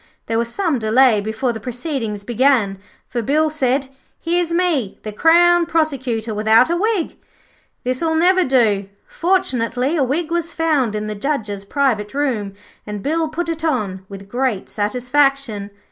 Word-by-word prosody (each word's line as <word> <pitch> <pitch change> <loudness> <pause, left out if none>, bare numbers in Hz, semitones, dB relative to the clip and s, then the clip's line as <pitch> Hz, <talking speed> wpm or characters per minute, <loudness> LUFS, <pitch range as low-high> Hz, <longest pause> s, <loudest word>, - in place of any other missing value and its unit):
There 225 0 0
was 235 0 -1
some 330 -7 0
delay 225 0 +4
before 220 +4 -2
the 225 - -6
proceedings 245 -3 -4
began, 235 -4 +2 0.3
for 240 - -3
Bill 305 +6 +1
said, 270 -2 0 0.3
'Here's 340 0 0
me, 335 - 0
the 215 - -5
Crown 340 +7 +4
Prosecutor, 265 -9 -1
without 220 +6 +4
a - - +2
wig. 405 -1 -1 0.7
This'll 260 +6 -1
never 365 +3 +4
do.' 215 - +2 0.2
Fortunately, 275 -7 0
a 295 - +2
wig 305 +6 -1
was 340 -1 -1
found 295 -9 +1
in 210 0 -3
the 215 - -3
Judge's 210 -4 -3
private 220 -2 -1
room, 230 -9 -1 0.3
and 210 -1 -5
Bill 320 +2 0
put 335 +3 -3
it 325 -1 -4
on 200 - -1
with 195 0 -10
great 245 -2 -2
satisfaction. 250 -1 0
260 Hz, 150 wpm, -19 LUFS, 215-320 Hz, 0.7 s, delay